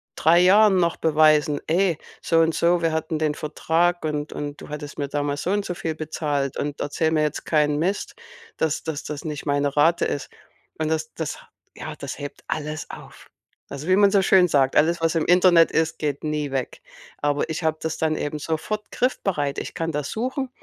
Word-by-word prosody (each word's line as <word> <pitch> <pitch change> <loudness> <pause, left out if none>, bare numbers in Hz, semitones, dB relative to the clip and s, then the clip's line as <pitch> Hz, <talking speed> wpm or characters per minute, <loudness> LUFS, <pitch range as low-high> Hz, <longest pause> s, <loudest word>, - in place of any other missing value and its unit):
3 165 +2 +4
Jahren 200 +3 +6
noch 170 -2 +1
beweisen: 155 -2 +3
„Ey, 170 0 +2 0.2
so 165 - +2
und 165 0 +2
so, 170 +1 +2
wir 165 - +2
hatten 160 0 -2
den 155 -1 0
Vertrag 165 +3 0
und 150 -1 -3
und 145 0 -6
du - - -10
hattest 150 0 -7
mir 140 - -1
damals 145 0 -2
so 180 - -1
und 205 0 0
so 180 - -3
viel 165 -3 -4
bezahlt 150 -3 -2
und 145 0 -3
erzähle 160 +2 0
mir 155 -1 +2
jetzt 150 - -3
keinen 150 -2 +2
Mist, 190 +5 -1 0.4
dass 160 -1 -1
dass 160 -3 -4
das 150 0 -6
nicht 150 -2 -5
meine 145 0 0
Rate 165 +4 +4
ist.“ 140 - -3 0.5
Und 155 -1 -1
das 155 0 -2
das 160 -2 -4 0.4
ja, - - -7
das - - -7
hebt 145 0 -8
alles 155 0 -4
auf. - - -13 0.4
Also, 140 +4 -6
wie 185 - +4
man 200 0 +5
so 200 -2 +4
schön 185 -1 +5
sagt: 135 -3 +2
„Alles, 165 +3 +3
was 165 -1 +1
im 160 - +1
Internet 175 -2 +5
ist, 160 0 0
geht 145 -1 -2
nie 150 -2 -2
weg.“ 135 -2 -3 0.4
Aber 145 0 0
ich 160 +2 -3
habe 160 0 +1
das 160 0 -3
dann 155 -1 +1
eben 150 +1 -3
sofort 165 +8 -3
griffbereit. 175 - -1
Ich - - -6
kann 165 0 -2
das 145 -1 -3
suchen 260 +3 -3
155 Hz, 205 wpm, -23 LUFS, 145-170 Hz, 0.5 s, Jahren